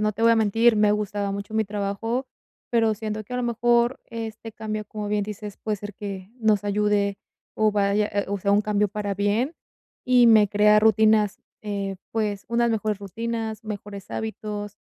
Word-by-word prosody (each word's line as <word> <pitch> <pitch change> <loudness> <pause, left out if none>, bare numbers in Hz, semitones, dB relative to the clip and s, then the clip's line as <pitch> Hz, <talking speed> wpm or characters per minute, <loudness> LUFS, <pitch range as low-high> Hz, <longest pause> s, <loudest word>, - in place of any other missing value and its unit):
no 215 0 +1
te 225 - -5
voy 230 - +6
a 230 - +5
mentir, 225 +2 +4
me 210 0 +4
gustaba 205 -1 -2
mucho 200 +1 -6
mi 220 - +2
trabajo, 210 +5 -2 0.4
pero 225 -2 +3
siento 215 0 -4
que 250 - -12
a - - 0
lo 250 - -1
mejor 240 +1 +2
este 225 -1 -7
cambio, 215 -1 -4
como 210 -1 -5
bien 210 0 +1
dices, 210 -1 -7
puede 215 -1 -2
ser 205 0 -8
que 195 -1 -7
nos 215 -3 +2
ayude 205 -1 +1 0.4
o 215 -1 +2
vaya 205 +1 +2 0.2
o 200 0 -2
sea 200 +1 +1
un 205 - +5
cambio 210 0 +1
para 205 0 -3
bien 210 - 0 0.5
y 250 -1 +5
me 215 -3 +6
crea 210 +1 +5
rutinas, 215 -1 +4 0.2
eh, 200 -2 -3 0.2
pues 210 -3 -2
unas 235 0 +2
mejores 215 -2 -1
rutinas, 225 +2 -4
mejores 205 -2 -7
hábitos 210 -2 -5
210 Hz, 180 wpm, -24 LUFS, 205-225 Hz, 0.5 s, voy